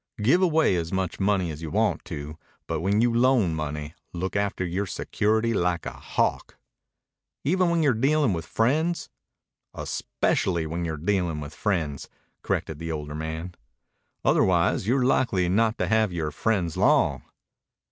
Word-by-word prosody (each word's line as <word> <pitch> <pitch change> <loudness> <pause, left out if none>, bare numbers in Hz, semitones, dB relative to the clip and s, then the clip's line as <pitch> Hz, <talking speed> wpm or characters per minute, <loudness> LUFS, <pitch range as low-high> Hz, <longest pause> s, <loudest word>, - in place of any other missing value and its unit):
Give 130 - +4
away 160 - +3
as 85 -1 -3
much 95 -2 -2
money 95 -4 +1
as 75 +1 -8
you 80 - -5
want - - +1
to, 75 +2 -7 0.3
but 80 -2 -3
when 100 +4 +2
you 120 0 +3
loan 120 -7 +3
money 75 -1 -4 0.2
look 90 +3 -3
after 100 -2 0
your 95 +3 -2
security 110 +5 0
like 90 -4 0
a - - -4
hawk." - - -2 0.9
"Even 180 +4 +2
when 170 -1 +2
you're 140 -4 +4
dealing 135 0 +2
with 80 -1 -4
friends?" 155 +9 0 0.7
"Especially 85 -4 -1
when 85 +2 -3
you're 80 -2 -3
dealing 85 -1 0
with 75 0 -7
friends," 80 -9 -2 0.3
corrected 80 -2 -2
the 80 0 -4
older 75 -1 -5
man. 80 +3 -5 0.7
"Otherwise 90 +1 +3
you're 125 +2 +2
likely 105 -9 +2
not 110 +4 +2
to - - 0
have 110 +1 +2
your 80 -3 -2
friends 90 -1 0
long." - - +3
95 Hz, 155 wpm, -26 LUFS, 80-115 Hz, 0.9 s, Give